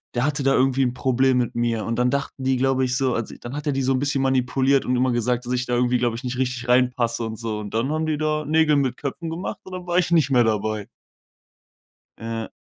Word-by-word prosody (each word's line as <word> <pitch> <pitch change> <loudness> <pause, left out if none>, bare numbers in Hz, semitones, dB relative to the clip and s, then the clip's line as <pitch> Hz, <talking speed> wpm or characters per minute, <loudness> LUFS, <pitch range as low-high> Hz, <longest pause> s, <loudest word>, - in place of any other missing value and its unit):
der 120 - +1
hatte 145 -1 -1
da 135 0 +3
irgendwie 135 +1 +2
'n 125 -1 -1
Problem 130 0 +2
mit 120 -2 0
mir. 115 -2 -1
Und 115 0 -2
dann 125 0 +3
dachten 140 0 -3
die, 130 0 +1
glaube 130 0 +1
ich, 125 0 0
so 130 -3 +1
also, 115 -2 -4
dann 120 +4 -7
hat 150 0 -5
er 145 - +1
die 135 0 -1
so 135 - +2
'n 130 - +1
bisschen 140 -1 0
manipuliert 130 +1 +2
und 125 - +1
immer 125 +1 +2
gesagt, 120 +1 0
dass 125 - -2
ich 125 0 -1
da 125 - 0
irgendwie, 125 0 +2
glaube 120 -1 0
ich, 120 - -7
nicht 125 0 -4
richtig 125 -1 -2
reinpasse 125 -2 +2
und 110 -1 -5
so. 110 -2 -4
Und 105 0 -7
dann 120 +6 0
haben 155 +1 -1
die 155 -1 0
da 155 0 0
Nägel 155 0 +3
mit 130 -3 0
Köpfen 155 +4 -5
gemacht 165 +4 -5
und 185 - -10
dann 180 -1 -6
war 175 0 +1
ich 175 - 0
nicht 160 -5 +3
mehr 125 -2 +5
dabei. 110 -1 -1 1.3
Ja. 115 0 -4
125 Hz, 260 wpm, -23 LUFS, 120-140 Hz, 1.3 s, mehr